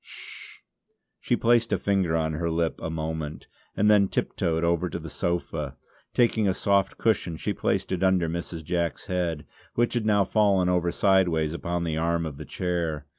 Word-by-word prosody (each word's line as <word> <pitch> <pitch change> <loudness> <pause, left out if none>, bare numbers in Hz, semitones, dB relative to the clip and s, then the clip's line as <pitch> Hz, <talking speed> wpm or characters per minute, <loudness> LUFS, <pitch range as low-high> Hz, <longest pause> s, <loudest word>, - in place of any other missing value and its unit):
Hsh!" - - -11 0.6
she - - +1
placed 120 0 +3
a - - +3
finger 95 -5 +1
on 80 -1 0
her 85 +2 -1
lip 80 0 -1
a - - -3
moment 80 -1 -4 0.3
and 105 - +3
then 105 -2 +5
tiptoed 80 -3 -1
over 85 +1 +1
to - - -4
the - - -8
sofa; 85 -4 -3 0.3
taking 115 -3 +2
a 95 - +1
soft 100 -1 +1
cushion 95 -7 0
she - - -2
placed - - -1
it 95 -1 -1
under 95 -3 +3
Mrs. 85 0 -5
Jack's 85 0 -2
head, 85 -4 -2 0.3
which 120 0 +2
had 115 -3 0
now 100 -2 +4
fallen 95 -3 +3
over 90 -1 +1
sideways 85 -6 +2
upon 85 +1 -2
the 80 -2 -2
arm 85 +1 0
of 75 -3 -6
the - - -8
chair. 85 -5 -2
85 Hz, 180 wpm, -26 LUFS, 80-95 Hz, 0.6 s, then